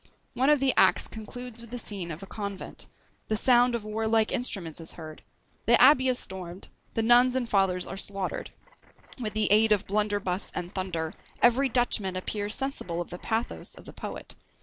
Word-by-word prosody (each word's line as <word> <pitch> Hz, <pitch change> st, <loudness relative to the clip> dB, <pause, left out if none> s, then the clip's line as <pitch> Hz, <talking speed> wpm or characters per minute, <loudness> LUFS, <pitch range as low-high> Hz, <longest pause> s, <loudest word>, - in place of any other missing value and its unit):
One 265 Hz, +3 st, +2 dB
of 300 Hz, -1 st, +5 dB
the 270 Hz, -1 st, +2 dB
acts -, -, +4 dB
concludes 235 Hz, +2 st, -8 dB
with 235 Hz, -, -11 dB
the 245 Hz, -, -5 dB
scene 200 Hz, -6 st, -4 dB
of 165 Hz, +3 st, -7 dB
a -, -, -6 dB
convent; 200 Hz, -1 st, -6 dB, 0.4 s
the 215 Hz, -, 0 dB
sound 245 Hz, +1 st, +4 dB
of 230 Hz, -, -4 dB
warlike 220 Hz, +1 st, +1 dB
instruments 180 Hz, -9 st, -3 dB
is 165 Hz, -, -2 dB
heard; 155 Hz, -2 st, -10 dB, 0.5 s
the 235 Hz, +1 st, +6 dB
abbey 260 Hz, 0 st, +7 dB
is 255 Hz, -1 st, +3 dB
stormed; 185 Hz, -2 st, -5 dB, 0.3 s
the 225 Hz, -, +1 dB
nuns 245 Hz, +2 st, +5 dB
and 255 Hz, -2 st, 0 dB
fathers 190 Hz, -4 st, +2 dB
are 195 Hz, -, -7 dB
slaughtered; 195 Hz, -1 st, -3 dB, 0.7 s
with 215 Hz, -4 st, -3 dB
the 215 Hz, -2 st, +1 dB
aid 215 Hz, +1 st, +5 dB
of 210 Hz, -1 st, +3 dB
"blunderbuss 205 Hz, -2 st, 0 dB
and 180 Hz, 0 st, -4 dB
thunder," 170 Hz, -4 st, -3 dB, 0.3 s
every 255 Hz, +3 st, +4 dB
Dutchman 225 Hz, -6 st, +1 dB
appears 205 Hz, +3 st, -2 dB
sensible 265 Hz, -11 st, -3 dB
of 175 Hz, -, -5 dB
the 175 Hz, -, -6 dB
pathos 225 Hz, +1 st, -3 dB
of -, -, -14 dB
the -, -, -10 dB
poet. -, -, -7 dB
215 Hz, 185 wpm, -28 LUFS, 190-240 Hz, 0.7 s, abbey